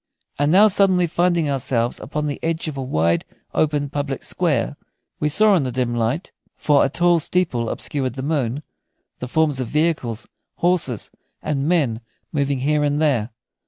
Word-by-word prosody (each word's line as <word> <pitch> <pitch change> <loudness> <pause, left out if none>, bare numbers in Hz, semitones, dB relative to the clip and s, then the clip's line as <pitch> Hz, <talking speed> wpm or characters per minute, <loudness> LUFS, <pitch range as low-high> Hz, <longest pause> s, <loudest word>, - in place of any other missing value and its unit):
And 145 +1 +2
now 200 +5 +7
suddenly 190 -3 +3
finding 170 -1 +1
ourselves 125 -3 -1
upon 150 +1 -4
the 145 -1 -3
edge 165 0 -2
of 155 - -4
a 135 - -4
wide, 85 -9 +1 0.3
open 145 -2 +1
public 140 -1 -4
square, 145 -7 0 0.4
we 150 - +1
saw 210 +7 +5
in 180 - +3
the 130 -2 -2
dim 125 -1 -1
light 120 - -1 0.2
for 145 -2 +3
a - - +1
tall 175 +3 +3
steeple 150 -9 -1
obscured 130 -4 -2
the 130 - -5
moon 140 -2 -1 0.6
the 125 - -5
forms 150 0 +1
of 130 - -2
vehicles, 150 -6 -1 0.3
horses, 165 - 0 0.3
and 140 -1 -1
men 135 -10 +1 0.3
moving 140 -3 0
here 150 +2 +1
and 145 0 +1
there. 130 -8 +1
145 Hz, 165 wpm, -21 LUFS, 130-160 Hz, 0.6 s, now